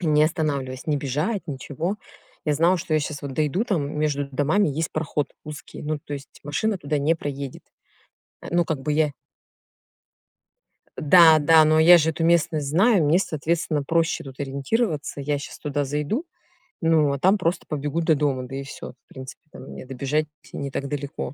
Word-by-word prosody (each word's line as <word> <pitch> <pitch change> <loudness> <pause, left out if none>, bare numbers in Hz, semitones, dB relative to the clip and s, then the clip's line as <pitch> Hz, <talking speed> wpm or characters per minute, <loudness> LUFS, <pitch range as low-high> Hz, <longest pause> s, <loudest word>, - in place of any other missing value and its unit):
Не 155 -3 +3
останавливаясь, 140 -6 -2
не 150 - +1
бежать, 150 - -2
ничего. 150 +6 -4 0.5
Я 150 - +1
знала, 170 +5 +3
что 170 -2 -2
я 155 - +3
щас 145 -1 -5
вот 140 -1 -5
дойду, 155 - 0
там 150 - -2
между 145 -2 0
домами 155 +8 +2
есть 155 +3 -2
проход 150 -2 -2
узкий, 150 -1 -9
ну 150 0 -2
то 145 - -10
есть 140 0 -11
машина 205 +9 -1
туда 145 -1 -2
не 150 +4 +2
проедет. 140 -4 -6 0.8
А - - -9
ну 175 0 +2
как 155 -4 -3
бы 150 +2 -2
я 150 -1 +2 1.9
да, 160 0 +7
да, 155 +1 +6
но 155 0 +4
я 170 +3 +8
же 160 0 +2
эту 160 +1 -4
местность 165 -3 +2
знаю, 190 +3 +4
мне, 155 +5 +4
соответственно, 160 -2 -1
проще 165 +2 0
тут 135 -1 -11
ориентироваться. 145 - -2
Я 145 +1 -1
щас 140 - -9
туда 145 -1 -2
зайду, 150 - -2 0.6
ну, 160 -3 +3
а 140 - -3
там 190 +7 +4
просто 175 -1 -1
побегу 150 +2 -2
до 160 -1 +3
дома, 140 -3 0
да 135 - -7
и 135 - -4
всё. 135 - -8
В - - -
принципе, 130 -1 -10
там - - -11
мне 70 - -9
добежать 140 +4 -1 0.3
не 140 -1 -4
так 140 +1 -3
далеко. 140 -2 -5
150 Hz, 185 wpm, -24 LUFS, 140-165 Hz, 1.9 s, я